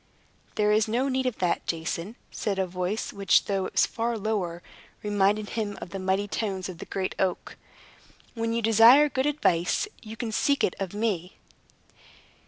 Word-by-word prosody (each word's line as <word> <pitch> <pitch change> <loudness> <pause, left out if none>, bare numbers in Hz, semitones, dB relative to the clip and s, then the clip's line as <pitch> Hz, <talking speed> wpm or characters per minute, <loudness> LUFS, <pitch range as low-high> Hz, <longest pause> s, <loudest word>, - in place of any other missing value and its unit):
"There 210 -1 +2
is 215 +1 +3
no 245 +5 0
need 260 0 0
of 250 - -2
that, 180 -2 -1
Jason," 170 +5 -3 0.2
said 200 -3 -2
a 190 - +1
voice 180 +4 -3
which, 195 -2 +3
though 195 -2 -1
it - - -12
was - - +4
far 235 0 -2
lower, 195 -5 -2 0.4
reminded 205 0 +1
him 210 -2 -3
of 175 - -8
the 195 - -5
mighty 190 +2 0
tones 195 -3 -3
of 175 -2 -9
the - - -8
great 190 -1 -2
oak. 185 -2 -1 0.8
"When 230 -1 -2
you 230 0 -1
desire 230 +7 +7
good 265 +1 0
advice, 280 - +1
you 220 -1 -9
can 230 -1 -3
seek 280 +5 +1
it - - +2
of 195 0 -4
me." 200 -5 -2
210 Hz, 180 wpm, -27 LUFS, 185-230 Hz, 0.8 s, desire